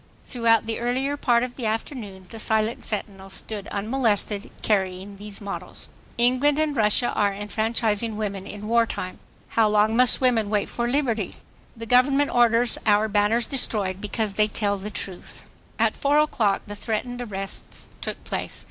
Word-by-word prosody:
Throughout 230 -3 +2
the 225 0 -3
earlier 260 +4 0
part 240 -4 +2
of 250 0 -4
the 240 -4 -2
afternoon 215 -4 -4
the 225 - -7
silent 220 +1 0
sentinels 195 -2 -4
stood 205 -2 -5
unmolested, 210 -2 0
carrying 195 -1 0
these 205 0 -8
mottoes: 200 -1 -5 0.3
ENGLAND 255 +4 +3
AND 310 -2 +1
RUSSIA 220 +1 +3
ARE 200 -1 +1
ENFRANCHISING 215 +1 -1
WOMEN 200 -2 -3
IN 210 0 -7
WAR 230 0 +3
TIME. 185 -3 -5 0.3
HOW 225 -1 +3
LONG 215 +1 +3
MUST 250 +1 +5
WOMEN 240 -5 +2
WAIT 210 -1 0
FOB 240 0 -2
LIBERTY? 240 -7 0 0.4
THE 230 - -6
GOVERNMENT 270 +4 +4
ORDERS 235 0 +3
OUR 210 +1 +4
BANNERS 210 +3 +2
DESTROYED 200 -8 0
BECAUSE 210 0 -1
THEY 210 +1 +3
TELL 205 -1 -1
THE 205 +2 -5
TRUTH. 190 -3 -5 0.3
At - - +2
four 285 0 +2
o'clock 235 -9 +2
the 205 - -7
threatened 230 +4 -3
arrests 195 -4 -6
took - - -4
place. - - -4
220 Hz, 160 wpm, -24 LUFS, 205-240 Hz, 0.4 s, MUST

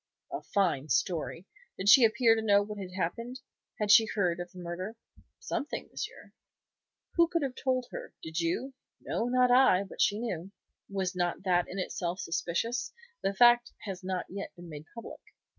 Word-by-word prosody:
"A - - -3
fine 160 -8 0
story! 170 +1 -1 0.3
Did 190 - -4
she 250 +4 +9
appear 225 +1 +5
to 225 - 0
know 205 -2 +4
what 210 0 -7
had 190 -2 -6
happened? 230 +9 -3 0.4
Had 210 -1 +2
she 220 +1 +8
heard 180 -6 0
of 175 0 -6
the - - -15
murder?" 180 +5 -5 0.4
"Something, 290 - -4
monsieur." - - -7 0.9
"Who 340 0 +6
could 335 -2 0
have 270 -2 -2
told 255 -1 -1
her? - - -7
Did 160 +1 -3
you?" 175 +11 -1 0.3
"No, - - -2
not 250 0 +3
I. 245 -7 +6
But 195 - -6
she 205 -1 +3
knew." 195 -6 -4 0.4
"Was 190 -2 -2
not 175 0 -1
that 180 -2 +2
in 190 - -6
itself 180 -1 -3
suspicious? 180 +8 -2 0.3
The 195 0 -1
fact 240 +2 +5
has 190 -3 -6
not 185 -1 -2
yet 200 +2 -6
been 175 -1 -11
made 150 -1 -8
public." 230 - -9
195 Hz, 175 wpm, -30 LUFS, 175-235 Hz, 0.9 s, she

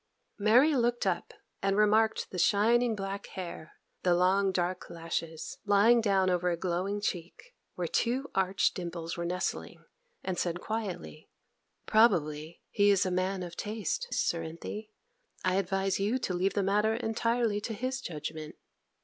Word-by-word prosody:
Mary 245 +9 +5
looked 240 -2 +1
up 180 -3 -1 0.3
and 195 0 +1
remarked 215 +1 +3
the 180 - -4
shining 225 +5 +3
black 195 0 -5
hair, 170 -3 -6 0.3
the 180 -1 +3
long 190 +2 +3
dark 180 0 -2
lashes, 165 -1 -5
lying 210 +3 +5
down 195 -3 +2
over 180 -1 +1
the 170 - 0
glowing 185 +4 -1
cheek, 200 - -5 0.2
where 180 - -2
two 255 - 0
arch 190 0 +2
dimples 170 -2 -5
were 170 -1 -3
nestling, 180 +1 -3 0.4
and 185 -2 -2
said 175 0 -1
quietly, 195 -7 -5 0.6
'Probably 165 -8 +2
he 205 0 +4
is 200 -2 +4
a 185 - -1
man 185 +1 -1
of 170 -1 -7
taste, 225 - -3
Cerinthy. 170 +6 -3 0.5
I 185 0 +2
advise 195 0 0
you 210 +6 +1
to 195 - -2
leave 185 +2 0
the 200 - +2
matter 210 +3 +2
entirely 230 -1 0
to 225 - -4
his 255 +4 -3
judgment. 155 - -6
195 Hz, 150 wpm, -30 LUFS, 175-220 Hz, 0.6 s, Mary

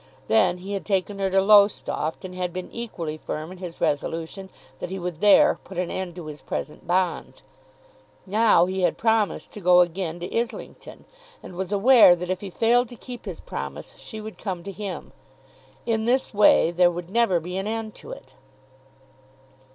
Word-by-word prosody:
Then 220 -5 +3
he 190 +3 -7
had 195 - -3
taken 200 0 -1
her 195 -1 0
to 195 +1 +3
Lowestoft, 200 -5 +3
and 185 - -7
had 180 -1 -3
been 185 +1 -6
equally 170 -10 -5
firm 155 +2 -6
in 185 - -11
his 175 -2 -8
resolution 165 +6 -2 0.3
that - - -5
he 190 - -4
would 180 -2 -5
there 205 -1 +5
put 190 - -11
an 180 -1 -2
end 185 -2 -4
to 175 -3 -8
his 150 -1 -9
present 155 - -6
bonds. 180 0 -1 0.8
Now 210 -3 +4
he 190 +1 -3
had 180 - +1
promised 220 -2 0
to 210 - -10
go 180 0 +6
again 175 -1 -2
to 175 - -6
Islington; 235 0 -5 0.4
and 180 - -10
was 190 +1 -4
aware 210 -2 +7
that 180 +1 -4
if 185 - -3
he 200 - -6
failed 235 +5 +2
to 245 - -10
keep 245 0 -10
his 185 -5 -6
promise, 70 0 -7
she 220 - -9
would 215 0 -9
come 185 -4 -4
to 200 - -6
him. 200 -1 -6 0.7
In 225 -2 0
this 255 +1 +1
way 205 -5 +5
there 175 0 +4
would 175 +1 -6
never 225 -6 +3
be 180 +3 -7
an 195 +2 -3
end 220 -1 -4
to - - -11
it. 130 - -11
190 Hz, 190 wpm, -24 LUFS, 175-210 Hz, 0.8 s, aware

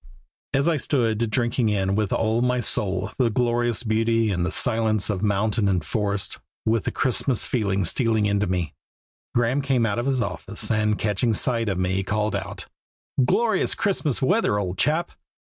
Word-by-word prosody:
As 140 +3 +2
I 165 -2 +2
stood 115 -5 0
drinking 120 0 0
in 95 -2 0
with 105 -1 0
all 115 +1 +1
my 125 0 +1
soul 100 -3 0
the 125 -3 +3
glorious 120 0 0
beauty 115 0 +1
and 90 -2 -1
the 90 - 0
silence 110 -1 +1
of 95 -3 -3
mountain 105 +1 +1
and 90 -5 0
forest, 100 +1 -2 0.3
with 110 -1 +1
the - - -1
Christmas 130 -1 +1
feeling 100 -5 0
stealing 110 +2 +2
into 100 0 +1
me, 90 -3 -2 0.6
Graeme 120 +4 +2
came 135 -4 +1
out 105 +1 -1
from 120 - -2
his 135 -2 +1
office, 100 +4 -3
and 105 -1 +1
catching 105 +2 0
sight 115 -1 0
of 95 - -1
me, 95 +1 0
called 105 +2 -1
out, - - -5 0.6
"Glorious 220 - +1
Christmas 155 -9 -1
weather, 180 - +2
old 95 -2 -3
chap!" 155 +4 +1
110 Hz, 170 wpm, -24 LUFS, 100-120 Hz, 0.6 s, the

